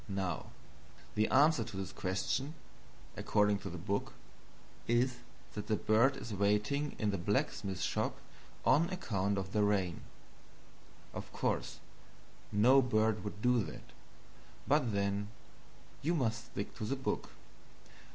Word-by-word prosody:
Now 95 Hz, -4 st, -2 dB, 0.7 s
the 110 Hz, +1 st, +2 dB
answer 145 Hz, -2 st, +5 dB
to 110 Hz, -3 st, -8 dB
this 95 Hz, -1 st, -4 dB
question 110 Hz, -, -1 dB, 0.6 s
according 105 Hz, -1 st, +2 dB
to 95 Hz, -, -6 dB
the 90 Hz, -, -6 dB
book 100 Hz, +4 st, -2 dB, 0.7 s
is 125 Hz, +2 st, +2 dB, 0.4 s
that 105 Hz, 0 st, -5 dB
the 110 Hz, -, +2 dB
bird 115 Hz, +7 st, +3 dB
is 115 Hz, -, -6 dB
waiting 105 Hz, +9 st, +1 dB
in 105 Hz, -2 st, +1 dB
the 100 Hz, -, -2 dB
blacksmith 100 Hz, -, -1 dB
shop -, -, 0 dB, 0.5 s
on 165 Hz, +4 st, +5 dB
account 100 Hz, -, -1 dB
of 95 Hz, -1 st, -3 dB
the 105 Hz, -, +2 dB
rain. 100 Hz, -4 st, +1 dB, 1.1 s
Of -, -, -7 dB
course -, -, -1 dB, 0.7 s
no 125 Hz, +7 st, +6 dB
bird 110 Hz, -3 st, +2 dB
would 105 Hz, 0 st, -6 dB
do 125 Hz, -2 st, +4 dB
that, 75 Hz, -, -10 dB, 0.8 s
but 140 Hz, -4 st, +3 dB
then 100 Hz, 0 st, 0 dB, 0.7 s
you 165 Hz, +5 st, +1 dB
must 120 Hz, -4 st, 0 dB
stick 100 Hz, -5 st, -5 dB
to 110 Hz, -, -3 dB
the 135 Hz, -, 0 dB
book. 135 Hz, -, -2 dB
105 Hz, 130 wpm, -34 LUFS, 100-125 Hz, 1.1 s, no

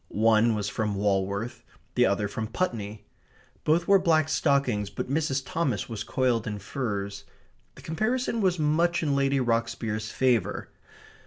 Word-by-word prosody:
One 110 Hz, +1 st, +3 dB
was 105 Hz, -1 st, -2 dB
from 105 Hz, -1 st, -2 dB
Walworth; 100 Hz, +4 st, -1 dB, 0.3 s
the 125 Hz, -, +4 dB
other 100 Hz, +1 st, 0 dB
from 110 Hz, +2 st, -4 dB
Putney. 110 Hz, -, -3 dB, 0.6 s
Both 170 Hz, +3 st, +2 dB
wore 195 Hz, -1 st, +6 dB
black 160 Hz, -4 st, +3 dB
stockings, 140 Hz, -10 st, +1 dB
but 130 Hz, -, -5 dB
Mrs. 140 Hz, -3 st, 0 dB
Thomas 165 Hz, -6 st, -1 dB
was 115 Hz, -4 st, -5 dB
coiled 125 Hz, -4 st, 0 dB
in 105 Hz, -1 st, -3 dB
furs. 100 Hz, -2 st, -4 dB, 0.5 s
The -, -, -14 dB
comparison 230 Hz, +7 st, -1 dB
was 185 Hz, -2 st, +2 dB
much 165 Hz, +3 st, +2 dB
in 145 Hz, -3 st, +1 dB
Lady 140 Hz, 0 st, +2 dB
Rocksbier's 115 Hz, -3 st, -1 dB
favour. 125 Hz, -6 st, 0 dB
120 Hz, 145 wpm, -27 LUFS, 105-155 Hz, 0.6 s, wore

